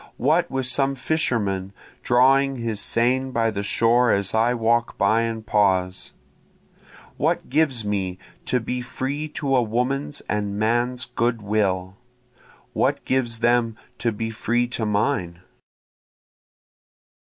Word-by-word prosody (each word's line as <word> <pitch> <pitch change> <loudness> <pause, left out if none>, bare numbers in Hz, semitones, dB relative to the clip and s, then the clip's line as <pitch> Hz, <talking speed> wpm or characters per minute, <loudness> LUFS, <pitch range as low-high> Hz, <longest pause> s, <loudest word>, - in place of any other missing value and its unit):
What 160 +7 +2
with 130 -1 -2
some 135 +2 +1
fisherman 105 -10 -1 0.3
drawing 135 +2 +4
his 115 -4 -3
seine 130 +3 +1
by 115 -3 +1
the 100 - -3
shore 115 +3 +3
as 100 -1 0
I 115 +2 +2
walk 115 0 +1
by 115 +1 +3
and 115 -1 -3
pause? 95 -4 +1 1.0
What - - 0
gives 135 -6 +1
me 95 -3 -2 0.3
to 125 - +1
be 125 +2 -3
free 135 +4 -4
to 140 -3 -1
a 125 - +4
woman's 125 +6 -1
and 105 -1 -3
man's 120 +3 0
good 120 -2 -1
will? 100 -3 -1 0.8
what - - 0
gives 120 -3 -1
them 120 -1 +2 0.2
to 115 - 0
be 115 +1 -4
free 120 +2 0
to 115 -3 -2
mine? 100 -5 -1
115 Hz, 130 wpm, -23 LUFS, 105-130 Hz, 1.0 s, drawing